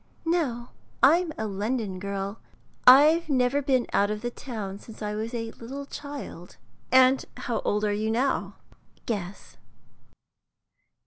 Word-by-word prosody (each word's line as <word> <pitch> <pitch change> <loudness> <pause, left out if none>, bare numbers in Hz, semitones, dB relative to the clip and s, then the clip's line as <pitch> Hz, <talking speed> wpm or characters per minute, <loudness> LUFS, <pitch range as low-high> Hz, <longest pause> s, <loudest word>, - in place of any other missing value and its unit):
"No, 280 -9 -1 0.3
I'm 330 +4 +5
a 220 - -2
London 210 -1 -2
girl. 200 +2 -4 0.5
I've 310 +6 +7
never 260 +1 +2
been 260 -3 +1
out 200 0 +3
of 210 +1 -4
the 240 - -2
town 210 -7 -6
since 225 - -13
I 210 0 -2
was 220 +2 -3
a 230 -1 -4
little 270 +4 -7
child." 285 - -8 0.3
"And 260 +1 +5
how 235 - -2
old 210 +1 0
are 205 - +1
you 215 +1 -1
now?" 255 +5 0 0.5
"Guess." 200 -4 -5
235 Hz, 135 wpm, -26 LUFS, 210-275 Hz, 0.5 s, I've